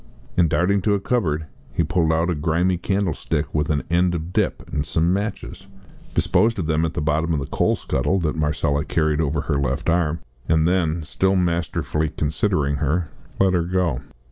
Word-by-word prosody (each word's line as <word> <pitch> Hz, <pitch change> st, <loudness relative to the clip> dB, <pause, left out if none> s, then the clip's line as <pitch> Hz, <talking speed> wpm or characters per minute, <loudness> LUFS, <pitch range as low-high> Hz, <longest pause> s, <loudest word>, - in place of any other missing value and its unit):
And 85 Hz, -2 st, +4 dB
darting 95 Hz, +5 st, +2 dB
to 105 Hz, +2 st, +2 dB
a -, -, 0 dB
cupboard 85 Hz, -9 st, 0 dB, 0.3 s
he 85 Hz, -, +1 dB
pulled 80 Hz, 0 st, +1 dB
out 80 Hz, +2 st, +1 dB
a -, -, +1 dB
grimy 85 Hz, +4 st, +1 dB
candlestick 85 Hz, -6 st, -1 dB
with 75 Hz, -1 st, 0 dB
an 75 Hz, -2 st, +1 dB
end 90 Hz, +1 st, +3 dB
of 85 Hz, +2 st, -5 dB
dip -, -, 0 dB
and 75 Hz, -, 0 dB
some 80 Hz, +3 st, +1 dB
matches, 100 Hz, +3 st, -4 dB, 0.5 s
disposed 115 Hz, 0 st, +2 dB
of 90 Hz, -, -2 dB
them 80 Hz, +1 st, +1 dB
at 80 Hz, -, -4 dB
the -, -, -1 dB
bottom 80 Hz, +2 st, +1 dB
of 75 Hz, -, 0 dB
the 70 Hz, -, -3 dB
coal -, -, +1 dB
scuttle 70 Hz, +10 st, 0 dB
that 75 Hz, -2 st, -1 dB
Marcella 75 Hz, -1 st, 0 dB
carried 75 Hz, 0 st, +1 dB
over 75 Hz, -1 st, 0 dB
her 75 Hz, -3 st, -1 dB
left 70 Hz, +4 st, 0 dB
arm, 85 Hz, -1 st, +1 dB, 0.3 s
and 80 Hz, 0 st, +3 dB
then, 85 Hz, -3 st, +1 dB
still 95 Hz, +5 st, +1 dB
masterfully 85 Hz, -3 st, 0 dB
considering 75 Hz, -1 st, 0 dB
her, 75 Hz, +3 st, -1 dB, 0.3 s
let 95 Hz, -1 st, +4 dB
her 90 Hz, -, +3 dB
go. 90 Hz, -7 st, 0 dB
80 Hz, 190 wpm, -22 LUFS, 75-90 Hz, 0.5 s, And